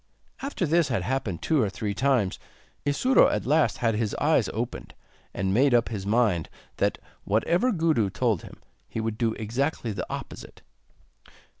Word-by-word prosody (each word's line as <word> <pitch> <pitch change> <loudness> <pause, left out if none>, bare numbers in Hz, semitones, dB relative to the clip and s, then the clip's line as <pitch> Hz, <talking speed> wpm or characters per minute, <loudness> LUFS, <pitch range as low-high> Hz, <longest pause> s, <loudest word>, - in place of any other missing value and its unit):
After 275 -9 -2
this 165 0 +3
had 115 -9 -1
happened 115 -7 -2
two 155 -4 +2
or 105 - +1
three 100 +1 -3
times, 125 -5 +1 0.5
Isuro 250 - +4
at - - -1
last 150 +4 +2
had 115 -2 +1
his 105 -1 -1
eyes - - +2
opened, - - -5 0.4
and 95 0 -1
made 130 +3 +4
up 120 -1 +2
his 100 -4 -5
mind 105 -7 +2 0.3
that, - - +1 0.3
whatever 170 - +2
Gudu 160 - +1
told 110 -2 0
him, - - -12 0.3
he - - -4
would 110 -1 -3
do 115 -2 +1
exactly 120 +3 -2
the 100 - -4
opposite. - - -8
115 Hz, 160 wpm, -26 LUFS, 105-145 Hz, 0.5 s, Isuro